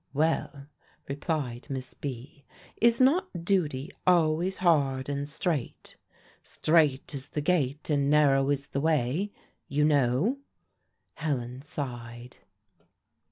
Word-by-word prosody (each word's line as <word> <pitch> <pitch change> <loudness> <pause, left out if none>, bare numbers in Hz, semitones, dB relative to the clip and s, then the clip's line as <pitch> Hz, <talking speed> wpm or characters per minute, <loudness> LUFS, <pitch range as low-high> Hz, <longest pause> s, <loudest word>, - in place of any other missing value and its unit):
"Well," 150 -2 0 0.4
replied 140 -4 -3
Miss 130 -2 -4
B., 140 +1 -7 0.3
"is 235 0 +4
not 260 - +2
duty 160 -5 0 0.2
always 175 +1 +3
hard 140 -7 +2
and 140 0 -3
strait? 150 -4 -3 0.5
'Strait 155 -5 +1
is 140 -1 -6
the - - -3
gate, 150 -4 0
and 145 -2 +1
narrow 140 -2 +4
is 140 -1 -1
the 140 - -2
way,' 155 +5 +1 0.4
you 150 +2 +1
know." 145 - +2 0.7
Helen 130 -5 -3
sighed. 120 -4 -7
145 Hz, 110 wpm, -28 LUFS, 135-165 Hz, 0.7 s, is